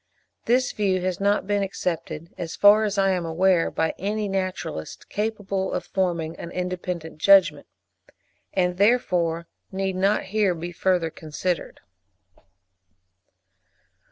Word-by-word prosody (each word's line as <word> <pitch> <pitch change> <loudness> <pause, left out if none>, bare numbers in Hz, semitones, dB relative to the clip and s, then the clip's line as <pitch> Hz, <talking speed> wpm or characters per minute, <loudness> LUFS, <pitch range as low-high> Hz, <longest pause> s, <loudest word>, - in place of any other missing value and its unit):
This 250 +2 +2
view 195 -3 0
has 185 -1 -2
not 200 0 +1
been 205 0 0
accepted, 170 -4 -4
as 165 -1 -5
far 210 +2 +6
as 205 -1 -2
I 195 -1 +3
am 180 -2 0
aware, 170 +1 +2
by 160 0 -1
any 210 +2 -1
naturalist 185 - -4
capable 205 -3 -2
of - - -2
forming 170 -4 -1
an 170 - -7
independent 180 -3 -4
judgment, 195 +1 +5 0.8
and 180 -1 0
therefore 180 -6 +2 0.3
need 190 0 -2
not 195 +3 +2
here 195 -2 +1
be 170 +2 -6
further 175 -2 0
considered. 165 +4 -4
185 Hz, 125 wpm, -24 LUFS, 170-200 Hz, 0.8 s, far